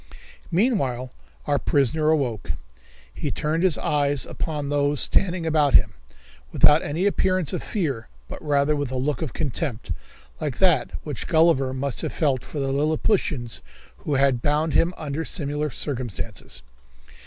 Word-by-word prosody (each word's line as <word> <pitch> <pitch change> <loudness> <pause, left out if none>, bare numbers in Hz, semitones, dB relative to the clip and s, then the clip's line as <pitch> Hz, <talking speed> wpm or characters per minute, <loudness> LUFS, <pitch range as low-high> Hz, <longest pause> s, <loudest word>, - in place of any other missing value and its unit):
Meanwhile 140 - 0 0.3
our 145 -1 +1
prisoner 150 +3 +1
awoke. 130 -10 0 0.6
He - - -3
turned 155 +2 -1
his 185 -3 +3
eyes 145 -2 +1
upon 150 -3 -4
those 145 0 +1
standing 180 -3 +1
about 150 -4 +3
him, 105 -2 +5 0.6
without 150 +2 +6
any 160 +6 -2
appearance 185 -4 +1
of - - -2
fear, 150 - -2 0.2
but - - -8
rather 145 0 +2
with 145 -3 -2
a 130 - -4
look 140 +5 -1
of 155 -8 -3
contempt, 135 - -3 0.5
like 140 -5 -3
that 175 -9 +3
which 145 -6 -5
Gulliver 160 -5 +3
must 130 +1 -2
have - - -3
felt 135 -6 +1
for - - -8
the 135 -1 -1
Lilliputians 145 - 0 0.4
who 140 - -2
had 135 -3 +3
bound 150 +3 +1
him 170 - +3
under 155 0 -3
similar 150 -2 -2
circumstances. 125 - -5
145 Hz, 145 wpm, -24 LUFS, 135-160 Hz, 0.6 s, without